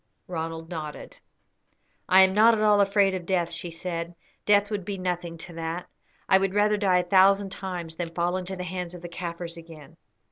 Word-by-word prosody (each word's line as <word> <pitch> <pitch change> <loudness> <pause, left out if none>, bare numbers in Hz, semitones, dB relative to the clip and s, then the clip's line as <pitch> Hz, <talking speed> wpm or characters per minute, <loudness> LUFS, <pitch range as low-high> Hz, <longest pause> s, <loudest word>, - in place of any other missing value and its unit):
Ronald 165 -1 -5
nodded. 155 -3 -7 0.9
"I 190 +1 +8
am 190 0 +3
not 225 +3 +6
at 215 - -2
all 210 -1 +5
afraid 200 -1 +3
of 180 -2 -5
death," 175 -3 0
she 170 +1 -4
said; 170 0 -5 0.3
"death 205 0 +4
would 205 -2 -2
be 195 +2 -4
nothing 175 -2 -3
to 170 +2 -9
that. 165 +1 -4 0.4
I 190 - +5
would 195 0 -1
rather 210 0 +3
die 195 -3 +2
a 175 - -10
thousand 195 +1 +4
times 175 -4 -6
than 175 -2 -3
fall 175 +2 -1
into 185 +1 -4
the 180 - -5
hands 180 0 -5
of 175 - -11
the - - -5
Kaffirs 170 -1 -5
again." 165 -4 -13
180 Hz, 200 wpm, -26 LUFS, 170-195 Hz, 0.9 s, I